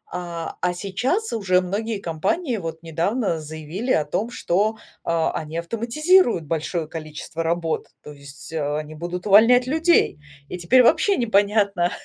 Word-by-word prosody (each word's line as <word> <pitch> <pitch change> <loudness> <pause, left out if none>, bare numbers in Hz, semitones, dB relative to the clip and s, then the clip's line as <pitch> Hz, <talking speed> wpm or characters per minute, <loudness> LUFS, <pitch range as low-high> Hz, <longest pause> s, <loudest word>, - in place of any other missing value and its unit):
А, 170 -2 -5
а 180 0 +1
сейчас 245 - -2
уже 190 -5 +2
многие 210 +4 -3
компании 240 - -1
вот 165 -2 -6
недавно 170 +4 -1
заявили 160 - -5
о 150 - +2
том, 215 +10 -2
что, 215 +1 0 0.3
э, - - -3
они 160 -1 -1
автоматизируют 235 - +2
большое 160 +1 -2
количество 160 +1 -7
работ, 165 -1 -1 0.2
то 150 - -10
есть, 140 +2 -12
э, 150 -1 -1
они 155 0 -6
будут 175 +3 -6
увольнять 230 +5 +6
людей, 320 - +2 0.3
и 180 - -6
теперь 250 +9 +5
вообще 390 - +3
непонятно, 200 -5 +2
180 Hz, 145 wpm, -22 LUFS, 160-230 Hz, 0.3 s, увольнять